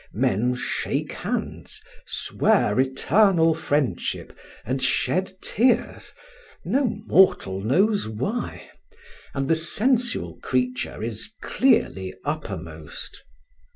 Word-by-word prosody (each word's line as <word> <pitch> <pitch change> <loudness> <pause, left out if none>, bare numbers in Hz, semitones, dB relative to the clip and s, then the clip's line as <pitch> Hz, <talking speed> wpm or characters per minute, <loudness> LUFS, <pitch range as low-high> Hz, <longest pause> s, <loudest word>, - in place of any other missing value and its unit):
Men 120 +6 +1
shake - - -2
hands, - - -4 0.3
swear 105 +4 +1
eternal 165 +6 +3
friendship, 145 -4 -2 0.3
and 130 +3 -2
shed 185 +8 +1
tears, 240 +1 +1 0.5
no 260 +10 +2 0.2
mortal 95 - +3
knows 190 - +2
why; 130 - -4 0.6
and 135 0 -1
the 165 - +4
sensual 240 +9 0
creature 125 -3 -1
is 115 - -4
clearly 95 - +1
uppermost. 90 - -6
140 Hz, 85 wpm, -24 LUFS, -, 0.6 s, the